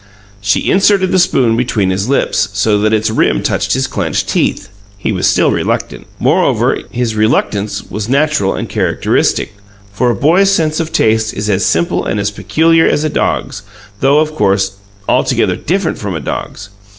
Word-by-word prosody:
She 100 0 0
inserted 195 -1 +3
the 185 - +3
spoon 125 -9 +2
between 110 -5 0
his 95 +5 -2
lips, 110 -6 +1
so 105 +1 +1
that 110 +1 +1
its 110 0 +1
rim 65 - +1
touched 95 +1 0
his 130 +1 0
clenched 90 - -2
teeth; 100 - -1 0.3
he 100 - -2
was - - 0
still - - +3
reluctant. - - -3
Moreover, - - +1
is 120 -2 -2
reluctance 105 -1 0
was 105 +1 -6
natural 140 -6 +1
and - - -4
characteristic, - - 0 0.4
for 120 +5 +1
a 120 - +1
boy's 175 - +3
sense 160 -4 +1
of 165 -1 -3
taste 110 -6 +1
is 105 +1 -2
as 95 0 0
simple 85 +1 0
and 105 - -2
as 100 +1 -1
peculiar 165 +9 +2
as 150 - +1
a 155 - 0
dog's, 135 -7 -2 0.4
though, 140 +2 +3
of 155 0 +1
course, 100 -8 +1 0.4
altogether - - +1
different - - -2
from - - -4
a - - -3
dog's. 105 - -6
110 Hz, 175 wpm, -14 LUFS, 100-155 Hz, 0.4 s, inserted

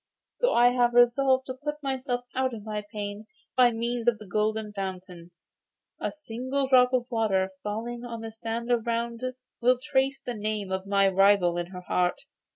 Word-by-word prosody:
So - - +1
I 240 +1 +6
have 245 -1 +2
resolved 260 +2 +4
to 255 - -4
put 295 0 -2
myself 260 -2 -2
out 260 -2 0
of 215 - -9
my 210 -1 -3
pain 205 0 -5 0.3
by 250 -1 +6
means 235 +1 -3
of 235 -2 +4
the 210 - -11
Golden 215 +2 -1
Fountain. 185 -3 -6 0.7
A - - -1
single 265 0 -3
drop 250 -1 +5
of 255 -2 +2
its 245 - -36
water 195 -5 +1
falling 230 +3 -4
on 235 -2 -6
the 225 0 -6
sand 230 +2 -4
around 235 0 -1 0.4
will 250 +1 +4
trace 270 -1 0
the 250 -3 -5
name 210 -2 -3
of 190 +1 -3
my 195 0 +4
rival 195 -2 +4
in 175 0 -2
her 180 0 -9
heart. 180 0 0
230 Hz, 180 wpm, -27 LUFS, 205-250 Hz, 0.7 s, I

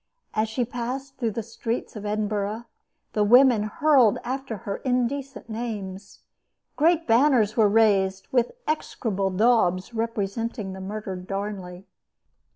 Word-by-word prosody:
As 215 +1 0
she 240 +2 -1
passed 255 +3 -5
through 235 -3 0
the 230 - -3
streets 230 +2 -4
of 210 -1 -5
Edinburgh 210 +1 -2 0.5
the 210 - +2
women 245 +1 +6
hurled 255 0 +4
after 260 -2 -4
her 200 - -2
indecent 260 +2 -2
names. 205 -4 -6 0.5
Great 330 +2 +3
banners 235 -3 +4
were 215 -3 +4
raised 195 -3 +3
with 245 -2 +2 0.2
execrable 210 -10 -1
daubs 190 -1 +2
representing 225 -2 -3
the 190 - -8
murdered 190 -2 -6
Darnley. 195 -2 -5
220 Hz, 125 wpm, -25 LUFS, 200-245 Hz, 0.5 s, women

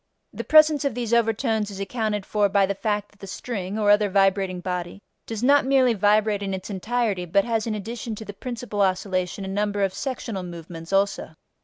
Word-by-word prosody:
The - - -5
presence 310 -1 +5
of 275 -5 -1
these 235 -2 -2
overtones 225 -2 +1
is 195 -1 -8
accounted 210 -1 -2
for 205 -1 +1
by 200 0 +3
the 200 - -1
fact 205 +1 -2
that 205 - -27
the 195 - -9
string 195 -1 -5
(or 205 -1 +3
other 205 0 +4
vibrating 195 -1 +2
body) 180 0 -4 0.3
does 225 0 -5
not 285 +2 +5
merely 260 -2 +3
vibrate 210 0 +2
in 195 -1 -2
its 190 +3 -7
entirety 205 -1 -1
but 195 +3 +2
has 225 -1 -1
in 220 - -1
addition 225 +2 -5
to 220 - -9
the 205 - -7
principal 235 -2 -4
oscillation 185 0 -1
a - - -5
number 205 +1 -1
of 190 -1 0
sectional 240 -7 -4
movements 170 -1 -9
also. 195 -5 0
205 Hz, 200 wpm, -24 LUFS, 195-225 Hz, 0.3 s, presence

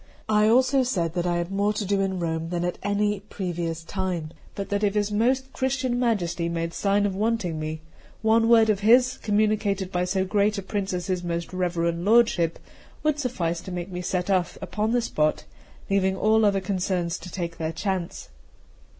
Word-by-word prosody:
I 210 0 +4
also 260 +4 +4
said 175 -10 -1
that 175 0 -1
I 175 0 +1
had 175 +2 -3
more 200 +2 +1
to 210 0 -3
do 195 0 +1
in 190 -1 -1
Rome 165 -1 -2
than 175 0 -1
at 175 - -3
any 205 0 0
previous 175 -5 -4
time; 180 -4 -3 0.2
but 200 - -5
that 205 +1 -1
if 205 0 +1
his 205 0 +1
most 260 +5 +1
Christian 260 -2 -1
Majesty 175 -8 0
made 165 0 -3
sign 200 0 +1
of 200 - 0
wanting 205 -6 -1
me, 155 0 -4 0.4
one 225 +1 +4
word 225 -2 +6
of 200 - -1
his, 245 +5 +4
communicated 205 -2 0
by 180 -1 0
so 190 +1 0
great 205 +2 +1
a 200 - -4
prince 195 0 -3
as 180 -1 -3
his 185 -2 -2
most 170 0 -3
reverend 170 -2 -1
lordship, 205 -6 +3 0.5
would 305 -1 +1
suffice 175 - -2
to 185 - -8
make 180 +1 -5
me 180 0 -4
set 180 +1 -1
off 185 -2 0
upon 215 +1 -2
the 245 0 +2
spot, 155 -7 0 0.4
leaving 190 -1 +1
all 220 +2 +3
other 200 -1 +2
concerns 185 -2 -1
to 180 - -9
take 170 -2 -4
their 160 0 -1
chance. 180 +1 -3
195 Hz, 195 wpm, -25 LUFS, 175-215 Hz, 0.5 s, word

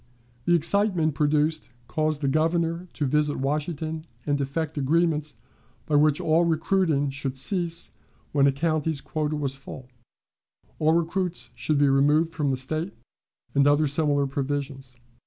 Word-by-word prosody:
The 175 - +4
excitement 170 -1 +2
produced 150 +2 +1 0.2
caused 155 0 -1
the 140 - 0
Governor 165 +4 0
to 150 - -2
visit 150 +2 +1
Washington 155 +3 -2 0.2
and 145 -1 0
effect 150 +3 -3
agreements 155 0 +1 0.5
by 155 - -4
which 150 +1 +4
all 165 -1 +3
recruiting 160 -3 +1
should 135 -1 -4
cease 170 +3 +1 0.4
when 140 -1 +4
a - - +4
county's 155 +1 -1
quota 155 +1 -2
was 140 -3 -2
full, 135 -2 -10 0.9
all 155 +1 +3
recruits 170 +2 -1
should 155 - -1
be 145 0 +4
removed 145 +4 +3
from 150 -3 -1
the 130 - 0
State, 155 +8 -3 0.6
and 140 0 +4
other 145 +1 +4
similar 145 -1 +1
provisions. 135 -2 -4
150 Hz, 140 wpm, -25 LUFS, 140-165 Hz, 0.9 s, The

